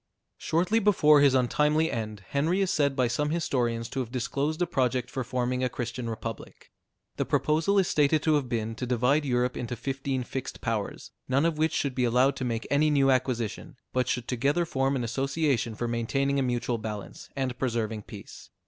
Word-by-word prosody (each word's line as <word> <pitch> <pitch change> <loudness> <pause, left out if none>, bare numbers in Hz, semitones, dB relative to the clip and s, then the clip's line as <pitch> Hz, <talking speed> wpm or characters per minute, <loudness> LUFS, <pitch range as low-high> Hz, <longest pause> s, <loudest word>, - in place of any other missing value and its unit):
Shortly 180 +7 +1
before 155 -8 +5
his 140 -2 +5
untimely 150 +5 +2
end, 110 -3 -4
Henry 160 +7 +1
is 190 - +1
said 140 -2 +1
by 130 -2 +2
some 150 +5 -1
historians 120 -8 -1
to 135 - -4
have 120 -3 -3
disclosed 140 +5 -2
a 175 - +2
project 125 -5 0
for 130 - -2
forming 125 +1 -1
a 130 - +1
Christian 120 0 -4
republic. 110 - -7 0.5
The - - 0
proposal 160 +6 +1
is 190 -2 +4
stated 150 0 +2
to 155 - +3
have 145 -4 +1
been, 115 -1 -2
to 125 - -3
divide 125 +5 +2
Europe 125 -1 +1
into 120 0 -4
fifteen 135 +1 -3
fixed 130 +1 -6
powers, 115 -4 -3 0.2
none 135 +4 +3
of 165 -2 0
which 160 0 +2
should 140 -2 0
be 125 - 0
allowed 125 +4 +3
to - - -3
make 115 -2 -2
any 150 +2 +4
new 140 -2 +4
acquisition, 130 +2 -1 0.2
but 125 -1 +1
should 125 -3 -2
together 140 +7 +1
form 135 -3 0
an 125 - -1
association 135 -1 0
for 120 - -2
maintaining 135 +4 0
a - - +2
mutual 120 -2 -1
balance, 105 -2 -7
and 130 -2 -2
preserving 115 -4 -1
peace. - - -11
130 Hz, 195 wpm, -27 LUFS, 120-145 Hz, 0.5 s, before